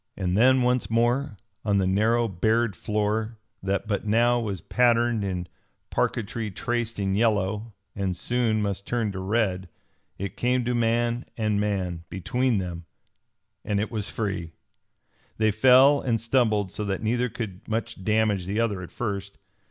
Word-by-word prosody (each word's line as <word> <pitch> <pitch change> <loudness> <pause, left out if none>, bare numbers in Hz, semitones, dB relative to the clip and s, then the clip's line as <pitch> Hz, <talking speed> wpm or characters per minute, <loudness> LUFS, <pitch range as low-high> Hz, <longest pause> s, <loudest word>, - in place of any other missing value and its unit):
And 90 -2 -1
then 130 +4 +5
once 125 0 +1
more, 120 +1 +1 0.3
on 100 -2 +2
the 95 - +2
narrow 110 +5 +2
bared 110 +2 +1
floor 105 +3 -1 0.2
that 100 +2 -1
but 105 -2 -1
now 120 +3 +3
was 105 -5 -3
patterned 120 -1 +2
in 90 -2 -3 0.4
parquetry 115 -1 -1
traced 115 +3 -2
in 95 -1 0
yellow, 105 0 0 0.2
and 95 -3 -2
soon 115 0 0
must 100 -1 -3
turn 115 -4 0
to 95 - -5
red, 95 -2 0 0.5
it 100 +1 -5
came 125 0 +1
to 125 - 0
man 120 +1 +1
and 110 -2 +1
man 95 -5 -2
between 115 +7 0
them 90 -3 -4 0.8
and 105 -1 0
it 105 - -2
was 105 -3 -3
free! 95 -7 -3 0.8
They 110 0 +3
fell 130 +6 +6
and 115 -3 0
stumbled 110 -5 +1
so 105 - -4
that 100 +1 -2
neither 120 +3 +1
could 100 -5 -7
much 110 -3 -3
damage 105 -3 +1
the 100 +3 -1
other 105 -5 0
at 90 - -9
first. 100 -4 -4
110 Hz, 155 wpm, -26 LUFS, 100-120 Hz, 0.8 s, fell